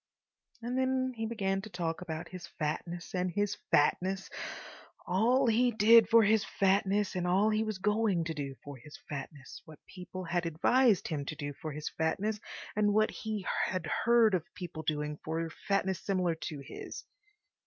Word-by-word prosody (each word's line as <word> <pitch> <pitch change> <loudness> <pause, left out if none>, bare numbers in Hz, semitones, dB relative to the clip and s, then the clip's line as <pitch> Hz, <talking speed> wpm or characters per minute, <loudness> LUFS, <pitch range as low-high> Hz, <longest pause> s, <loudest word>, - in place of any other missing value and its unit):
And 245 +2 -2
then 260 0 +1
he 225 -1 -3
began 195 -4 -1
to 215 - -9
talk 170 -3 -3
about 165 -1 -5
his 180 -2 -8
fatness 160 +1 -3
and 180 0 0
his 205 +3 -1
fatness; 185 +6 +2 0.7
all 235 +9 +3
he 240 +2 +4
did 225 0 +6
for 230 -1 +7
his 215 0 +4
fatness 195 +1 +1
and 180 -1 -1
all 195 +4 +3
he 215 +1 +1
was 215 -2 -3
going 210 -3 +1
to 160 0 -3
do 140 -3 -5
for 145 -1 -8
his 145 +5 -12
fatness; 140 -1 -7
what 155 -2 -13
people 185 0 -8
had 175 0 -1
advised 215 +6 +3
him 150 -3 -2
to 155 - -4
do 145 -1 -5
for 155 +2 -6
his 150 +1 -5
fatness 205 +7 -1 0.4
and 205 -1 +2
what 215 0 +3
he 215 -4 -4 0.2
had 185 -2 -2 0.2
heard 235 -2 +5
of 180 -4 +1
people 170 -4 -6
doing 150 -1 -2
for 165 +1 -2 0.2
fatness 195 -2 +1
similar 185 -4 +1
to 160 -1 -6
his. - - -8
185 Hz, 175 wpm, -31 LUFS, 160-215 Hz, 0.7 s, for